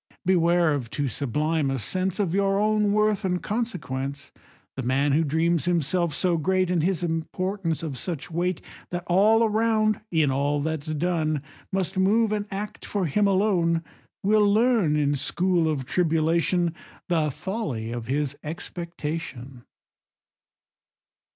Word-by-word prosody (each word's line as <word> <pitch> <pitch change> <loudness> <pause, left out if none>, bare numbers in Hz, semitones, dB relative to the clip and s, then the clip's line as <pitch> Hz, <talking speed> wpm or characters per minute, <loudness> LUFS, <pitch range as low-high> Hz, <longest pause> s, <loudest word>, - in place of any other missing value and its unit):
Beware 170 -3 +3
of 130 -5 -3
too 145 +2 -2
sublime 150 +4 0
a 135 - -1
sense 185 - -2
Of 185 -5 0
your 195 0 +2
own 210 -1 +2
worth 210 -1 +2
and 180 -1 0
consequence: 140 - -4 0.4
The 135 - -3
man 135 +3 +1
who 155 +4 +3
dreams 160 +2 +1
himself 170 -1 +1
so 175 -1 +1
great, 185 +3 +1
And 175 -3 +2
his 180 +1 0
importance 170 +1 -2
of 140 -6 -4
such 170 0 -5
weight, 175 +1 -1 0.3
That 175 0 -4
all 210 +6 +4
around, 215 -1 +2
in 155 -5 +2
all 140 +2 +1
that's 155 0 -3
done, 155 -3 0 0.3
Must 190 0 -1
move 215 +3 +3
and 210 -1 -1
act 205 +2 -6
for 200 -3 -1
him 200 +7 +2
alone, 185 -4 +2 0.4
Will 210 0 +4
learn 220 -8 +3
in 145 -1 +2
school 170 +4 +1
of 140 -4 -2
tribulation 165 +2 +1 0.3
The 160 -4 +1
folly 145 - -4
of 120 -1 -5
his 140 +1 -1
expectation. 155 -6 -6
170 Hz, 140 wpm, -25 LUFS, 150-195 Hz, 0.4 s, all